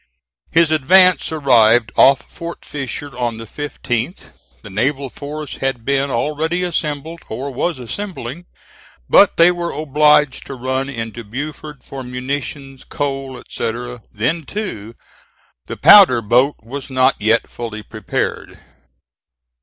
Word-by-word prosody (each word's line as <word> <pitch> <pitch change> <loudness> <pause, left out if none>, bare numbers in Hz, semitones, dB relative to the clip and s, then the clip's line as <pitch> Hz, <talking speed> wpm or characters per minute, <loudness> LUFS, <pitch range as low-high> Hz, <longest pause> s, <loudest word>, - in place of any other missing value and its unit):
His 165 -1 +3
advance 180 +5 +4
arrived 120 -6 +4
off 135 0 +5
Fort 170 0 -9
Fisher 140 0 -6
on 120 -2 -2
the 115 - -8
15th. 130 - -4 0.3
The 105 - -10
naval 135 +6 -1
force 150 0 -7
had 135 -4 -3
been 140 0 +1
already 155 +7 -1
assembled, 160 -1 -3
or 130 +5 -4
was 165 +5 -1
assembling, 165 - -6 0.6
but 200 - +5
they 170 +1 +7
were 175 -1 -3
obliged 150 -2 +2
to 135 - -6
run 130 +2 -2
into 115 -2 -6
Beaufort 145 +5 -7
for 135 - -8
munitions, 135 +2 -5
coal, 135 -2 -4
etc.; 120 +1 -5
then, 120 +11 -1
too, 140 - -6 0.7
the - - -6
powder 155 - +7
boat 125 +7 +3
was 135 +4 -7
not 130 0 +3
yet 110 +2 +2
fully 110 -3 -7
prepared. - - -4
135 Hz, 125 wpm, -18 LUFS, 120-150 Hz, 0.7 s, they